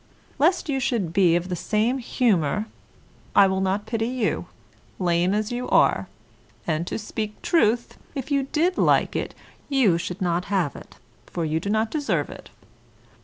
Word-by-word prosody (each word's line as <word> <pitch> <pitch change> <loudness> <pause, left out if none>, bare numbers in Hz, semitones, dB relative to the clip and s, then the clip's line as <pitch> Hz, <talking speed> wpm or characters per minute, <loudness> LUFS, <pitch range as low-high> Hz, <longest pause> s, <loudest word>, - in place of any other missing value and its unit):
Lest 345 +5 +3
you 275 -3 0
should 230 -9 -1
be 180 -3 +4
of 175 +1 -1
the 180 - -2
same 220 +8 0
humour 210 - +1 0.7
I 200 - +8
will 190 0 0
not 190 +2 0
pity 225 0 -1
you, 245 -3 -1 0.5
lame 175 0 +2
as 215 +2 -1
you 245 +1 -3
are; - - +3 0.6
and 165 +1 -1
to - - -2
speak 215 -1 -5
truth, 240 - +1 0.2
if 275 +1 -5
you 275 -1 +1
did 345 +4 +1
like - - +3
it, - - -3 0.3
you 235 -12 +3
should 180 +3 -5
not 175 -1 0
have 190 -7 0
it, - - -12 0.3
for 170 -2 -3
you 155 +1 0
do 200 - -4
not 220 +1 +1
deserve 300 -2 -1
it. - - -11
210 Hz, 170 wpm, -24 LUFS, 180-250 Hz, 0.7 s, I